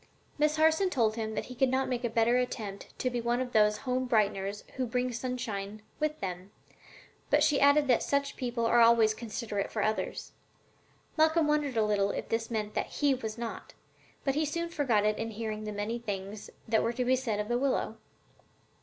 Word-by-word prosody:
Miss 300 0 +3
Harson 320 +4 +3
told 225 -9 +1
him 220 -1 -3
that - - -2
he 250 - -9
could 260 +1 +2
not 265 +1 +1
make 250 -1 -2
a 240 - 0
better 230 +1 +3
attempt 215 -5 -4
than - - -25
to 255 - 0
be 240 -1 -2
one 240 +1 0
of 255 -1 -3
those 210 -1 +4
home 255 0 0
brighteners 205 -3 0
who 255 -1 -1
bring 250 +2 0
the - - -6
sunshine 215 -4 -4 0.2
with 305 0 -1
them, 185 0 -5 0.8
but - - +4
she 290 - +3
added 285 +1 +5
that 245 -3 +4
such 280 0 0
people 240 -2 -2
are 235 +1 +4
always 230 -2 +6
considerate 215 -2 -4
for 215 - -1
others. 215 0 -2 0.9
Malcolm 315 +1 +4
wondered 295 -4 0
a 220 - +3
little 205 -1 +1
if - - -4
this 225 0 -1
meant 215 -2 -3
that - - -1
he 285 -2 +1
was 225 -4 -4
not, 235 -1 -6 0.5
but 270 - +1
he 305 +3 +1
soon 335 +3 -2
forgot 255 -10 +1
it 215 0 +1
in 225 - -2
hearing 215 -1 -4
the 210 - -3
many 210 +3 -3
things 205 -2 -5 0.2
that 220 -1 +3
were 230 - 0
to 250 +1 -1
be 255 +1 +4
said 235 -5 -2
of 210 - -2
the 240 +1 0
willow. 265 -4 0
235 Hz, 210 wpm, -30 LUFS, 215-260 Hz, 0.9 s, always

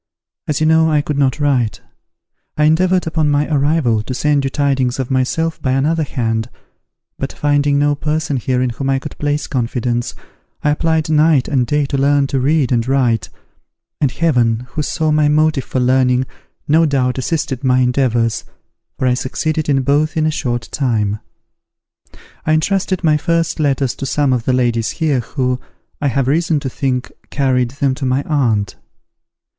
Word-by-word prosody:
As 150 - -1
you 155 - +1
know 160 0 +4
I 150 -1 +2
could 145 -1 -3
not 135 +1 +1
write, 130 -7 +1 0.8
I 150 - +2
endeavoured 180 +4 +3
upon 160 -2 0
my 145 +1 +1
arrival, 140 -6 +2
to 125 +4 -5
send 145 +1 +1
you 135 - 0
tidings 135 -3 0
of 130 -1 -3
myself 160 +6 -1
by 130 - 0
another 155 +5 +1
hand; 115 -5 -2 0.7
but, - - -3
finding 145 -1 +1
no 145 0 +2
person 150 -1 -2
here 125 0 0
in 125 - -1
whom 135 +3 -3
I 135 - +2
could 140 +2 -7
place 145 0 -1
confidence, 120 -1 -2 0.5
I 150 - +3
applied 160 +1 0
night 155 -3 +3
and 130 -4 0
day 145 +2 +1
to 135 0 -2
learn 140 0 +3
to 135 - +2
read 140 0 +1
and 120 -1 +1
write, 125 -5 +1 0.7
and 145 - +2
Heaven, 120 -9 +1
who 155 - -2
saw 155 +1 -1
my 150 -1 +3
motive 150 -2 +2
for 130 - -2
learning, 125 0 +2 0.4
no 160 +2 +4
doubt 130 -2 0
assisted 135 -2 -2
my 130 -1 +3
endeavours, 125 -3 +1 0.5
for - - -1
I 125 - +3
succeeded 155 +5 -2
in 135 -2 +2
both 150 +4 +1
in 155 - +2
a 155 - +2
short 120 -5 -3
time. 110 -7 0 1.2
I 155 - +1
entrusted 185 +3 0
my 155 -2 +3
first 165 +1 -1
letters 135 -4 +1
to 135 - -4
some 145 -1 +1
of 120 -3 -2
the 130 - +1
ladies 120 -3 +1
here, 150 -5 +1
who, 125 +1 -2 0.4
I 145 - +1
have 135 0 0
reason 160 +2 +1
to 135 - -3
think, 125 -2 -2 0.2
carried 130 -3 +1
them 140 -3 +1
to 135 +1 -4
my 130 +2 0
aunt. 115 -9 0
140 Hz, 175 wpm, -17 LUFS, 125-150 Hz, 1.2 s, know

